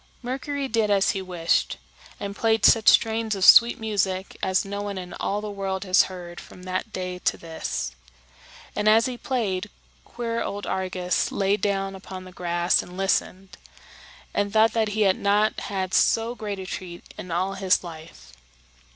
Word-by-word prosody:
Mercury 275 +3 -3
did 225 -4 +1
as 200 -1 +3
he 195 - -3
wished, 175 -3 0 0.4
and 200 0 -5
played 225 0 +2
such 225 -1 +5
strains 225 -1 +2
of 190 - +1
sweet 235 +1 +8
music 195 -3 -2
as 190 0 +1
no 200 +1 -4
one 205 -1 -4
in 180 -1 -7
all 205 +1 -1
the 210 -1 -5
world 195 -1 -3
has 185 -1 +4
heard 175 -2 -9
from 180 - -13
that 185 +4 -3
day 180 -2 -5
to - - 0
this. 160 - -4 0.8
And 210 +1 +2
as 225 +2 +5
he 255 - -3
played, 210 -7 -2 0.3
queer 230 -1 -4
old 205 -2 -4
Argus 185 -1 -1
lay 195 0 +1
down 195 -2 -1
upon 190 -1 -9
the 185 - -12
grass 175 -1 +1
and 180 +1 -11
listened, 195 0 -1 0.8
and 205 0 0
thought 220 +1 +4
that 225 -1 +1
he - - +1
had 195 -2 +3
not 210 +2 +2
had 190 -2 -4
so 230 +1 +3
great 210 -4 -5
a 190 - -6
treat 180 -2 -7
in 185 - -8
all 185 +3 -1
his 190 -1 +2
life. 160 - -11
195 Hz, 175 wpm, -24 LUFS, 185-215 Hz, 0.8 s, sweet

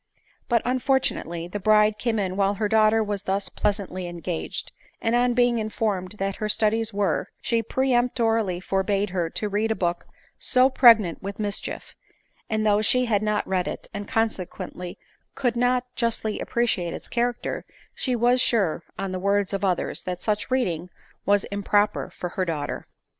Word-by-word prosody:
But, 235 -2 +3
unfortunately, 250 -10 0
the 205 +4 -5
bride 210 +1 +4
came 230 -2 0
in 190 -3 -1
while 200 0 +2
her 210 +1 0
daughter 220 +1 +4
was 205 -2 -3
thus 195 0 -1
pleasantly 195 -3 -2
engaged; 165 - -4 0.3
and 225 - 0
on 245 0 +3
being 245 -1 +3
informed 210 -3 -2
what 195 0 -2
her 215 - -2
studies 220 +1 +2
were, 200 -5 0
she 230 -2 +1
peremptorilly 230 -6 +1
forbade 195 +1 0
her 175 -3 -1
to 210 - -3
read 210 +2 0
a 220 - +1
book 175 -3 -2 0.3
so 255 +1 +4
pregnant 225 -10 +6
with 200 +1 -5
mischief; 205 -1 -4 0.6
and 215 -1 0
though 210 0 +4
she 250 +4 +3
had 210 -4 +1
not 210 -1 0
read 185 -1 0
it, - - -5
and 205 0 -5
consequently 185 -4 -3 0.4
could 245 -3 0
not 245 +1 +2
justly 225 -2 -1
appreciate 215 -8 0
its - - -9
character; 240 0 -1 0.3
she 255 -2 -1
was 245 +2 +3
sure, 200 -12 +2 0.2
on 195 -1 -3
the 185 - -3
words 200 +1 +1
of 195 - -2
others, 185 -3 0
that 180 -1 -5
such 210 +2 -1
reading 180 -10 0 0.4
was 205 0 +4
improper 205 +1 +1
for 180 - -5
her 185 +1 -2
daughter. 155 -5 -3
210 Hz, 165 wpm, -25 LUFS, 190-230 Hz, 0.6 s, pregnant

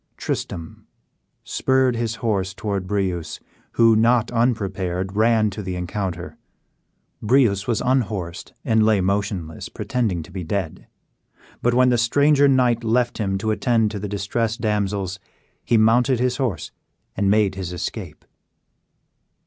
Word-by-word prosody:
Tristram 80 -1 -5 0.6
spurred 130 -2 +1
his 115 -1 -2
horse 95 -3 0
towards 100 -3 -3
Breuse, 95 -5 -2 0.3
who, 115 -1 +5
not 115 +1 +3
unprepared, 95 -6 -1
ran 110 -1 +3
to 105 - -6
the 95 -2 -4
encounter. 90 -1 -4 0.8
Breuse 105 -4 +2
was 115 -3 0
unhorsed, 105 -9 -1
and 110 -1 +3
lay 110 -2 +3
motionless, 95 -4 -2
pretending 105 -10 -2
to 90 - -15
be 90 -1 -5
dead; 95 -1 -4 0.7
but 120 0 +2
when 125 0 +5
the 120 -1 +2
stranger 145 +4 +4
knight 125 -3 +2
left 120 +2 +1
him 95 -2 0
to 110 +3 -1
attend 115 -1 +1
to 105 - -5
the 100 +1 -5
distressed 110 +3 -2
damsels, 100 -3 -1 0.4
he 115 - +2
mounted 120 +3 +3
his 125 0 0
horse, 115 - -2 0.4
and 100 0 +1
made 105 -1 +3
his 95 -2 -5
escape. 90 - -6
105 Hz, 135 wpm, -22 LUFS, 95-120 Hz, 0.8 s, who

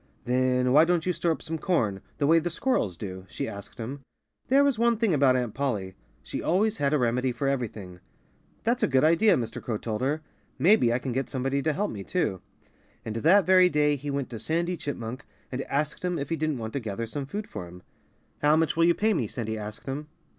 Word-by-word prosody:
"Then 125 0 +2
why 150 +3 +8
don't 170 -1 +1
you 180 - +1
store 170 0 0
up 160 - -3
some 160 0 -3
corn, 110 - 0 0.2
the 145 - +1
way 165 +3 +5
the 170 +2 -2
squirrels 165 - 0
do?" 95 -2 -7
she - - -4
asked 100 -2 -9
him. 125 +5 -5 0.5
There 275 +2 +5
was 280 -5 +1
one 235 -1 +3
thing 220 -5 +2
about 135 -3 +4
Aunt 125 -4 -1
Polly 105 -9 -2 0.3
she - - -5
always 210 +6 +1
had 140 -1 +1
a 150 - +3
remedy 125 0 +1
for 125 +3 -2
everything. 110 -9 -3 0.6
"That's 235 +2 +1
a 215 - +3
good 130 -4 +3
idea!" 170 +7 +5
Mr. 115 -2 -4
Crow 115 -3 -2
told 110 0 -4
her. 150 +4 0 0.3
"Maybe 175 - +4
I 120 - +2
can 130 0 -4
get 130 +3 -2
somebody 135 +1 -1
to 155 - +1
help 200 +8 -1
me, 100 -2 -6
too." 95 - -1 0.6
And 110 0 -4
that 175 - +5
very 185 -1 +6
day 150 -2 +2
he 145 +1 -6
went 140 -3 -2
to 115 - -6
Sandy 170 - -1
Chipmunk 130 -5 -5 0.3
and 130 +1 -2
asked 150 +4 -2
him 180 -1 0
if 140 -1 -4
he 165 - 0
didn't 155 -2 -1
want 110 -1 -5
to 140 - -1
gather 110 -1 -4
some 135 +4 -5
food 205 +7 -5
for 90 - -7
him. 90 +1 -13 0.6
"How 150 +1 +5
much 160 -1 +1
will 165 0 +4
you 170 0 +4
pay 220 +1 +2
me?" 130 - 0
Sandy 110 0 -4
asked 105 0 -7
him. 140 +3 -4
140 Hz, 230 wpm, -27 LUFS, 115-165 Hz, 0.6 s, why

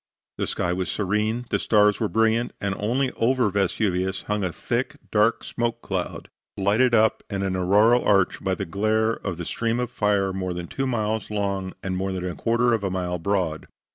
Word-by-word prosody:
The - - 0
sky 90 - -1
was 90 0 -2
serene, 105 +4 -1
the - - +2
stars 105 -2 +3
were 110 - +1
brilliant, 115 +2 +1
and 100 -1 -1
only 125 +5 0
over 120 -2 +1
Vesuvius 95 -1 0
hung 105 -1 -1
a 90 - -1
thick, 125 - -2 0.2
dark 105 +2 +3
smoke 120 0 -3
cloud, 90 -2 -4 0.3
lighted 110 +5 +3
up 110 0 +3
into 100 -1 -2
an 95 -1 -1
auroral 105 +7 +4
arch 95 -2 +2
by 95 -1 0
the 100 - -4
glare 110 +5 +1
of 95 -6 -5
a 85 - -4
stream 115 +5 -1
of 125 -1 -2
fire 100 -4 +1
more 95 -1 -3
than 85 0 -5
two 135 +9 -3
miles 110 -3 -1
long, 100 -2 -2
and 95 -1 -2
more 95 +1 -1
than 90 -1 -3
a 90 - -3
quarter 120 +3 +1
of 110 -3 0
a 95 - 0
mile 90 -1 -2
broad. 90 -3 -1
105 Hz, 200 wpm, -24 LUFS, 95-115 Hz, 0.3 s, auroral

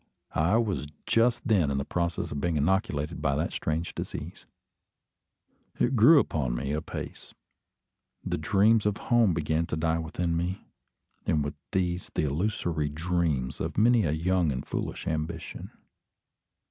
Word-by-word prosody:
I 90 +8 +3
was 105 -10 -1 0.2
just 115 +2 +2
then 95 -10 +3
in 70 - -1
process 85 -1 -2
of 70 - -3
being 85 -1 0
inoculated 75 -1 0
by 70 -3 +1
that 80 +4 -1
strange 80 +2 -2
disease. - - -6 1.3
It 130 +2 +2
grew 130 +8 +8
upon 65 - -1
me 70 +3 -2
apace. 75 +2 -6 0.9
The - - -2
dreams 105 +6 +3
of 105 0 0
home 115 -8 +3
began 80 +1 0
to 80 - -2
die 80 +1 +1
within 85 +1 -2
me; 90 +3 -2 0.6
and 75 -2 +2
with 70 - -3 0.2
these 90 -2 -1
the - - +1
illusory 80 -1 -1
ideas 80 -5 -1
of - - -3
many 115 +1 +5
a 75 - +1
young 85 +1 +1
and 65 -1 -4
foolish - - -4
ambition. 80 +1 -4
85 Hz, 145 wpm, -28 LUFS, 75-95 Hz, 1.3 s, grew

